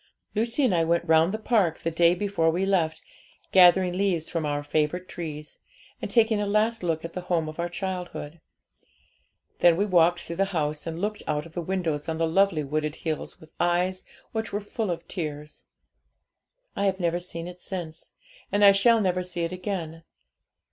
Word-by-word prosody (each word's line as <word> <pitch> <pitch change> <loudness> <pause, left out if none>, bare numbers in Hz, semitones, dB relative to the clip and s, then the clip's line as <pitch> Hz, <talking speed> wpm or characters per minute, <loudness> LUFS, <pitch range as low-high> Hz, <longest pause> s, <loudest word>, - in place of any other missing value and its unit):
Lucy 230 +6 0
and 250 - +3
I 165 -2 +3
went 170 +1 +1
round 160 +1 +4
the 215 - -2
park 215 -7 +1
the 165 - -3
day 170 +1 +4
before 195 -4 +1
we 175 +4 0
left, 175 -5 0 0.5
gathering 180 0 +6
leaves 180 -4 0
from 165 -3 -2
our 145 0 -2
favourite 155 +5 -1
trees, 150 -3 -7 0.4
and - - -4
taking 225 -2 +3
a 205 - -1
last 220 +3 +1
look 165 -2 -1
at 165 - -7
the 180 - -4
home 170 -3 0
of 155 +2 -8
our 170 0 -1
childhood. 175 -4 -5 1.2
Then 170 -1 +5
we 200 - +2
walked 175 -2 +3
through 170 - -7
the 195 - +3
house, 150 +1 -2
and 165 0 -4
looked 210 +2 -2
out 150 0 -1
of 165 - -13
the 175 - -3
windows 165 -4 -2
on 160 - -2
the 165 - +1
lovely 175 -2 +2
wooded 150 +2 -2
hills 160 -2 -4
with 155 - -16
eyes 180 +2 +1 0.3
which 220 0 -3
were 205 - -1
full 210 0 -4
of 170 - -4
tears. 150 -4 -6 1.1
I 200 - +1
have 190 0 0
never 175 -1 0
seen 175 -1 -6
it 180 0 -10
since, 165 -4 -6 0.4
and 205 0 +4
I 200 - +10
shall 225 +3 +4
never 185 -2 +1
see 180 -1 -5
it 165 - -2
again. 180 -3 -4
175 Hz, 190 wpm, -26 LUFS, 160-195 Hz, 1.2 s, I